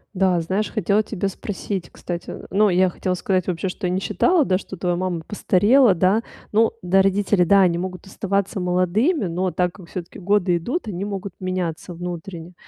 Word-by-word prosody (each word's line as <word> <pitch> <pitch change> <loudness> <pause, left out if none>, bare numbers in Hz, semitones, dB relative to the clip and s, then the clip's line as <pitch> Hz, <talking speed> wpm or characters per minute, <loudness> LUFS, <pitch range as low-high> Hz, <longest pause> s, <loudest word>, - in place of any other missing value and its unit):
Да, 185 -2 +2
знаешь, 190 +6 -1
хотела 210 0 +1
тебя 200 -2 -3
спросить, 195 -1 -5
кстати, 175 -1 -6
э. - - -9
Ну, 210 +1 +3
я 185 0 +3
хотела 180 +1 -2
сказать 185 0 0
вообще, 185 +1 -1
что 185 +2 -5
я 180 - 0
не 185 - +1
считала, 355 - +2
да, 190 -7 +2
что 190 - -8
твоя 175 0 -1
мама 180 -2 -2
постарела, 210 +4 +4
да. 185 +6 +2 0.3
Ну 220 +2 +3
да, 190 +1 +3
родители, 195 -1 +2
да, 195 +3 +5
они 175 -3 +3
могут 185 +1 -5
оставаться 195 0 -2
молодыми, 185 - +1
но 180 +2 -1
так 180 +1 0
как 185 -4 -13
всё-таки 175 -1 -7
годы 190 -2 +2
идут, 240 - -3
они 195 -1 -3
могут 200 -2 -5
меняться 185 -2 -3
внутренне. 175 0 -7
185 Hz, 190 wpm, -22 LUFS, 180-200 Hz, 0.3 s, да